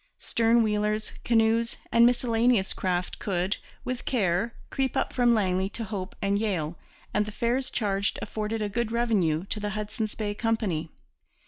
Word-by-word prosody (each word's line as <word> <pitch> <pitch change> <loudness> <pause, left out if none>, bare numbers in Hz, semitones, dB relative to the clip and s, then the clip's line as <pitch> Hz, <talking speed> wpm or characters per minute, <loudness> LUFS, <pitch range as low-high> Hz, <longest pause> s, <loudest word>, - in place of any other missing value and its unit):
Stern 230 0 +3
wheelers, 210 0 0
canoes, 230 0 +2 0.2
and 235 0 +7
miscellaneous 240 -4 +2
craft 180 -1 -2
could, 190 0 0 0.3
with 250 -1 -3
care, 210 -1 +1 0.2
creep 265 -2 0
up - - 0
from 240 -2 +4
Langley 190 -2 +1
to 230 - -5
Hope 195 -3 -5
and 200 +1 +2
Yale; 175 -7 -1 0.4
and 210 0 +1
the - - -4
fares 240 +4 0
charged 200 -2 0
afforded 220 0 -3
a - - 0
good 230 +2 -1
revenue 195 -9 +1
to 210 - -3
the 210 0 -2
Hudson's 215 +1 -3
Bay 210 -2 -2
Company. 205 -8 -1
215 Hz, 155 wpm, -27 LUFS, 195-230 Hz, 0.4 s, and